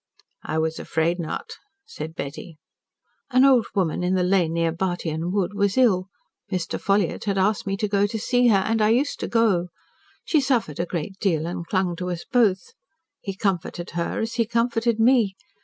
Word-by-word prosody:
"I 155 - -3
was 160 0 -1
afraid 165 +2 0
not," 160 -2 -5 0.3
said 165 - -8
Betty. 155 +3 -7 0.7
"An 255 0 +5
old 255 -5 +5
woman 180 -4 0
in 180 +1 +1
the 185 - +2
lane 180 -3 +2
near 165 0 +1
Bartyon 170 -1 -2
Wood 200 -1 0
was 200 +1 0
ill. 195 -8 +3 0.4
Mr. 185 -3 -2
Ffolliott 200 -1 0
had 200 -2 0
asked 200 +2 +1
me 195 0 -1
to 210 - -1
go 200 0 +2
to 220 - -4
see 245 +3 +2
her, 215 -4 +5
and 225 0 +1
I 210 - +4
used 260 +6 +1
to - - -3
go. 215 -7 +2 0.6
She 310 - +3
suffered 235 - 0
a 170 - -1
great 175 +3 -5
deal 165 -6 +1
and 170 0 -5
clung 185 -3 0
to 180 +1 -4
us 175 -1 -5
both. 205 -7 +1 0.5
He 195 -2 -6
comforted 180 -3 -2
her, 170 0 -2
as 225 +1 -3
he 230 0 +1
comforted 230 0 0
me. 225 -4 +4
195 Hz, 190 wpm, -24 LUFS, 175-225 Hz, 0.7 s, An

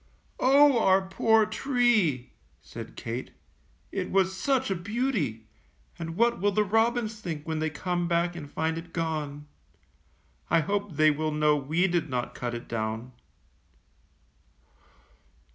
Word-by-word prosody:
''Oh, 275 0 +5
our 190 -1 +4
poor 220 +3 +3
tree!^^ 215 - +1 0.3
said - - -10
Kate, 120 +3 -5 0.6
"it - - -3
was 190 0 +2
such 265 +3 0
a - - +1
beauty, 185 - -2 0.5
and 165 -1 -5
what 235 -1 +2
will 205 +1 +3
the 210 +2 +2
robins 225 +1 +1
think 165 -6 -6
when 160 -1 -2
they 160 0 0
come 175 +3 -2
back 170 +1 +1
and 150 -4 -8
find 160 +2 -1
it 165 0 -13
gone? 150 -3 -3 1.0
I 165 0 +4
hope 200 +1 -2
they 155 +1 +5
will 155 +1 -1
know 150 0 +3
we 155 +6 +1
did 170 -4 0
not 125 -2 -3
cut 120 -1 -4
it 120 - -7
down. 110 +2 -3
170 Hz, 140 wpm, -27 LUFS, 150-215 Hz, 1.0 s, Oh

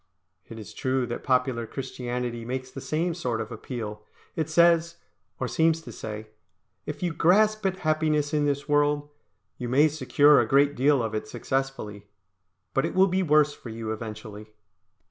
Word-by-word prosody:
It 115 - -8
is 110 -3 -9
true 130 -1 0
that 120 - -5
popular 125 -3 +1
Christianity 125 -2 -4
makes 130 +2 -5
the 135 - -8
same 165 +5 -1
sort 125 -9 -2
of 110 +1 -5
appeal. 110 -2 -6 0.3
It 160 -1 -2
says, 170 +1 +4 0.4
or - - -1
seems 160 0 +2
to - - -10
say, 110 0 -7 0.6
"If - - -5
you 175 -2 0
grasp 210 +7 +3
at 190 0 -2
happiness 155 -1 +1
in 150 -1 +2
this 140 0 -1
world, 145 0 +2 0.5
you 120 -1 -4
may 145 +5 +5
secure 150 -2 +4
a 115 - -1
great 140 +3 +4
deal 140 -1 +3
of 110 -1 -3
it 110 - -3
successfully; 130 -7 -3 0.7
but 135 - +2
it 165 - -3
will 190 +1 +6
be 185 +2 +1
worse 150 -3 +4
for 120 - -11
you 110 0 -5
eventually." 110 -1 -7
135 Hz, 170 wpm, -26 LUFS, 115-155 Hz, 0.7 s, will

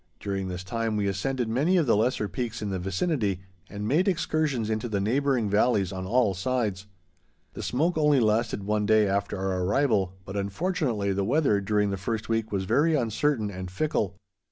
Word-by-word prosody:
During 95 -1 -3
this 90 0 -5
time 115 +2 -2
we 105 - 0
ascended 120 +6 -1
many 145 +11 +2
of 165 - +3
the 115 - +3
lesser 110 0 +1
peaks 110 +4 -4
in 100 - -2
the 95 - -2
vicinity, 95 - -1 0.3
and 105 +1 -5
made 160 - +2
excursions 155 - 0
into 110 +2 -2
the 100 -2 0
neighboring 125 +2 +1
valleys 105 -2 +2
on 95 -1 -5
all 115 -2 +3
sides. 100 -1 -2 0.7
The - - -7
smoke 160 +6 0
only 150 -2 +4
lasted 110 -2 +1
one 105 +1 0
day 110 -1 +4
after 100 +1 -1
our 95 -1 -1
arrival, 100 -3 +1
but, 95 - -7
unfortunately, 105 - -1
the 100 +1 0
weather 120 -3 +2
during 105 0 +1
the 100 - -2
first 110 +4 -3
week 115 -1 -1
was 100 -2 -1
very 155 - +3
uncertain 120 -2 0
and 95 -1 -6
fickle. 100 - -1
110 Hz, 185 wpm, -27 LUFS, 100-130 Hz, 0.7 s, only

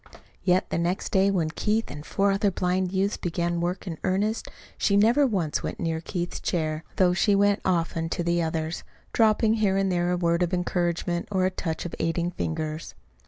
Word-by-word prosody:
Yet 185 0 +3
the - - 0
next 175 +3 -1
day 195 +1 +4
when 170 -5 0
Keith 215 +6 -1
and 145 - -7
four 200 +5 +1
other 200 +1 +2
blind 180 0 0
youths 195 +2 0
began 170 0 -1
work 175 +3 -2
in 165 -4 -5
earnest, 205 +4 0 0.3
she 200 - +2
never 235 +7 +5
once 180 - -1
went - - -5
near 160 -1 -1
Keith's 175 0 -4
chair, 155 -2 -1
though 180 -2 +4
she 200 +3 +3
went 200 0 +3
often 165 -2 0
to 175 - -2
the 170 0 +1
others, 160 0 -2 0.3
dropping 220 0 +4
here 200 -3 +2
and 195 -1 +1
there 175 0 +1
a 180 - +1
word 170 0 +1
of 180 +1 +1
encouragement 175 -1 -1
or 190 -2 +2
a 185 - +1
touch 165 -3 -4
of 175 - -5
aiding 170 +1 0
fingers. 160 -2 -4
180 Hz, 195 wpm, -26 LUFS, 170-195 Hz, 0.3 s, never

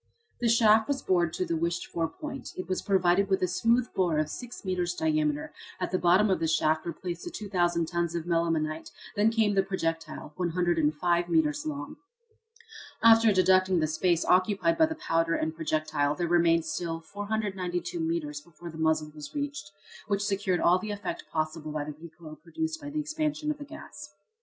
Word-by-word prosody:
The 240 - +1
shaft 220 -1 +5
was 280 -2 -2
bored 175 -3 +2
to 185 - -1
the 165 -1 -1
wished 170 +2 -1
for 165 -1 -2
point. 285 - -8
It 185 - -5
was 185 -1 -1
provided 190 0 +2
with 190 -1 +1
a - - +3
smooth 230 +6 +2
bore 175 -5 +1
of 155 0 0
six 245 -4 -8
metres 180 -2 -1
diameter. 155 -2 0 0.3
At 180 - -2
the 185 - +1
bottom 185 +4 +4
of 190 - +1
the 165 - 0
shaft 155 0 +1
were - - -1
placed 175 +1 -6
the - - -5
2,000 175 -5 0
tons 170 0 -1
of 170 -1 -3
melimelonite; 165 -2 0 0.3
then 210 +2 +4
came 220 -2 +2
the 195 - +4
projectile 165 -5 -4
105 175 -1 +1
metres 155 -3 +1
long. 145 -1 -5 1.1
After 225 -1 +7
deducting 185 -1 +4
the 155 - +2
space 170 +2 +1
occupied 200 - +3
by 320 -1 +4
the 320 - -4
powder 165 0 +2
and 160 0 -1
projectile 155 -2 0
there 170 +2 -1
remained 170 -1 +3
still 165 +1 -3
492 190 -2 -3
metres 160 -3 -2
before 170 +2 -11
the 160 - -10
muzzle 155 -1 +1
was 150 - -10
reached, 285 -8 -4 0.4
which 200 -1 0
secured 195 -3 0
all 180 +2 +4
the 215 - -6
effect 205 -2 -4
possible 155 -1 -2
by 150 -1 -2
the 150 0 -6
recoil 160 -2 -11
produced 320 - -4
by 290 - -6
the 305 +1 -3
expansion 305 0 -1
of 300 - -6
the 290 - -7
gas. 310 +2 -11
175 Hz, 185 wpm, -28 LUFS, 160-205 Hz, 1.1 s, After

